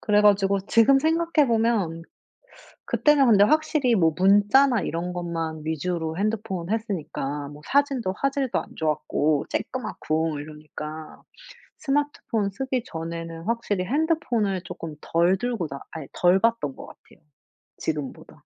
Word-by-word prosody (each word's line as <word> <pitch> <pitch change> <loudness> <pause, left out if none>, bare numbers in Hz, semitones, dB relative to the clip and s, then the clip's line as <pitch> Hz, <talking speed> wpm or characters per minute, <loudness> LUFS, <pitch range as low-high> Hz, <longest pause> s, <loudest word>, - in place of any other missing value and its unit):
그래 210 -1 +3
가지고 200 -1 +4
지금 230 +5 +5
생각해 325 0 +2
보면 220 -8 +1 0.8
그때는 295 -2 +3
근데 210 -4 +6
확실히 295 -2 +2
뭐 165 -4 +3
문자나 205 +7 +4
이런 170 +2 -3
것만 165 -3 -4
위주로 160 0 -2
핸드폰 200 -3 -2
했으니까 155 -10 -3
뭐 145 +1 -12
사진도 270 -9 +1
화질도 275 -1 0
안 - - -10
좋았고 155 -1 0
조그맣고 160 - -2
이러니까. 155 +1 -9 0.6
스마트폰 275 -7 -1
쓰기 255 +4 -2
전에는 165 -1 -6
확실히 210 -4 -1
핸드폰을 245 - 0
쪼끔 165 -2 -7
덜 170 +3 +2
들고 235 -6 -2
다 140 0 -7
아 160 -3 -7
덜 180 +2 +3
봤던 230 -11 +1
것 - - -9
같아요, - - -18 0.6
지금보다. 150 -4 -5
195 Hz, 295 characters per minute, -25 LUFS, 165-240 Hz, 0.8 s, 근데